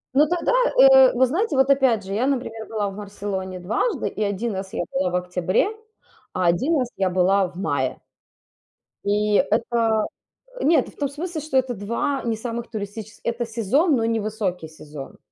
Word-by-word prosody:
Но 295 +3 +5
тогда, 350 +1 0 0.4
э, - - +7
вы 260 - +4
знаете, 330 - -1
вот 265 +1 +4
опять 260 -6 +3
же, 195 - -5
я, 235 +6 +1
например, 235 -5 -3
была 210 -2 -2
в 195 - -9
Барселоне 195 -2 -5
дважды, 205 - -1
и - - -5
1 205 +3 -2
раз 190 0 -5
я - - -1
была 180 0 0
в 180 - -3
октябре, 180 - 0 0.7
а 185 - 0
1 260 - +2
раз 255 -3 0
я 190 -1 +1
была 185 +2 +3
в 180 - -15
мае. 140 -9 -1 1.1
И 210 +1 +1 0.2
это 230 -2 +1 0.6
Нет, 325 +1 +4
то - - -12
в - - -24
том 285 -2 -1
смысле, 315 +3 -5
что 290 -2 -1
это 260 -1 +1
2 235 +7 -2
не 225 -2 -1
самых 235 +1 -5
туристически 215 0 -7
это 235 +1 -2
сезон, 240 - +2
но 230 -2 0
не 225 0 +1
высокий 205 -6 -3
сезон. 150 -3 -10
220 Hz, 185 wpm, -23 LUFS, 190-260 Hz, 1.1 s, э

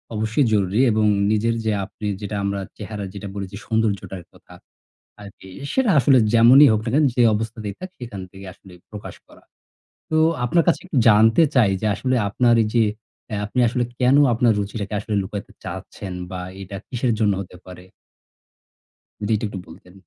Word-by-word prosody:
অবশ্যই 110 +6 +1
জরুরি। 100 +3 +1
এবং 110 0 +1 0.3
নিজের 115 +2 +1
যে 110 - +1
আপনে 105 +2 -7
যেটা 105 0 -5
আমরা 100 0 -2 0.2
চেহারা 105 0 -6
যেটা 100 0 -7
বলেছি 100 -1 -6
সৌন্দর্যটার 100 -5 -2
কথা - - -18 0.7
আরকি, 100 -1 -13 0.2
সেটা 265 -5 +2
আসলে 135 0 +5
যেমনই 120 +5 +7
হোক 110 - +1
না - - -3
কেন 150 +1 +4
যে 125 - +3
অবস্থাতেই 110 -1 -4
থাক, 185 0 -7
সেখান 115 -6 -8
থেকে 95 0 -12
আসলে 95 +1 -18 0.2
প্রকাশ 105 -1 -9
করা। - - -20 0.7
তো 155 - +2 0.3
আপনার 170 +7 +2
কাছে 170 - +3
একটু 175 -6 -4
জানতে 115 +6 +5
চাই 120 -6 +5
যে, - - -2
আসলে 130 0 -1
আপনার 120 +3 +3
এইযে 110 +2 +1 0.5
অ্যা 105 - -3
আপনি 125 +5 -3
আসলে 120 +2 -1 0.2
কেনো 130 +3 +4
আপনার 115 0 +3
রুচিটাকে 100 +1 -5
আসলে 105 0 -4
লুকাইতে 100 +1 -7
চাচ্ছেন 95 -2 -7 0.2
বা 90 - -5 0.2
এইটা 95 +1 -8
কিসের 125 0 -1
জন্য 105 -3 +2
হতে 90 -1 -11
পারে? 90 0 -12 1.4
যেটি 110 +1 0
একটু 100 -2 -7
বলতেন। 90 +2 -15
110 Hz, 165 wpm, -21 LUFS, 100-120 Hz, 1.4 s, যেমনই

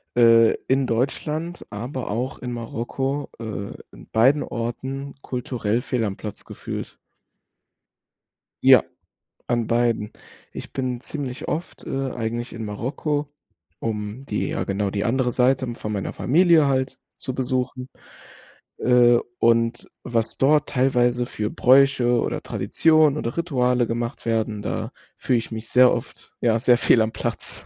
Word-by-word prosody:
äh, 115 -1 +6
in 130 0 +2
Deutschland, 150 +8 -2
aber 120 +4 -5
auch 125 +5 -3
in 125 -1 -5
Marokko, 130 +4 -3
äh, 110 -3 -5 0.2
in - - -14
beiden 135 +7 +4
Orten 130 +4 -5
kulturell 120 -2 -2
fehl 120 -3 -1
am 100 - -3
Platz 105 -2 -7
gefühlt. - - -7 1.7
Ja, - - +8 0.6
an 120 -2 0
beiden. 115 -3 +1 0.4
Ich - - -8
bin 125 -2 -2
ziemlich 135 -2 -5
oft, 165 +4 -4
äh, 135 -1 -2
eigentlich 120 +1 -4
in 115 -1 -6
Marokko, 145 +7 -3 0.5
um 110 +3 -4
die - - -2
ja, - - -2
genau, 100 0 -1
die 100 +1 -2
andere 125 +1 +1
Seite 130 0 +2
von 105 - -5
meiner 100 -2 -3
Familie 165 +1 +4
halt 130 -1 0 0.2
zu 130 - -5
besuchen, 130 0 -2 0.9
äh, 120 -1 +5 0.2
und 115 +1 +2
was 115 -1 -1
dort 150 +3 +3
teilweise 125 -2 +2
für 105 -3 -3
Bräuche 130 -2 +4
oder - - -2
Traditionen 155 -2 +3
oder 120 -5 -3
Rituale 125 -8 +1
gemacht 120 +2 -4
werden, 110 -2 -1
da - - -3 0.3
fühle 125 -2 +1
ich 115 - -8
mich 110 0 -6
sehr 125 0 +6
oft 120 +4 -6
ja 115 -1 +2
sehr 120 0 +4
fehl 115 -1 +4
am 110 - +1
Platz. - - -4
125 Hz, 140 wpm, -23 LUFS, 115-135 Hz, 1.7 s, Ja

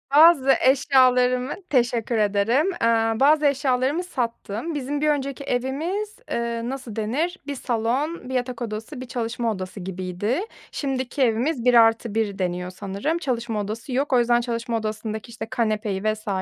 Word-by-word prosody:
Bazı 300 -4 +7
eşyalarımı 255 -1 +4 0.2
Teşekkür 235 -3 +1
ederim. 215 - +2
Eee, 225 -7 +1
bazı 300 +2 +5
eşyalarımı 275 +3 +1
sattım. 250 - -4
Bizim 285 +1 -2
bir 305 - +3
önceki 280 -2 -1
evimiz, 305 - -2
eee, 235 0 -1
nasıl 255 -5 -6
denir? 285 - -1
1 285 - -3
salon, 255 +6 -2
1 - - -4
yatak 250 -1 -2
odası, 225 +4 -5
1 - - -5
çalışma 230 -1 -2
odası 190 -1 -6
gibiydi. 185 - -2 0.3
Şimdiki 270 -1 -3
evimiz 245 +2 +1
1 250 - +5
artı 225 -1 +4
1 210 -3 -1
deniyor 180 -1 -2
sanırım. 200 - -2
Çalışma 235 -8 -2
odası 220 +5 -5
yok. 275 +2 0
O 250 - +6
yüzden 240 0 +3
çalışma 235 0 -2
odasındaki, 215 +1 -4
işte, 230 -1 -6
kanepeyi 215 -4 -1
vs. 215 0 -2
240 Hz, 150 wpm, -24 LUFS, 220-275 Hz, 0.3 s, Bazı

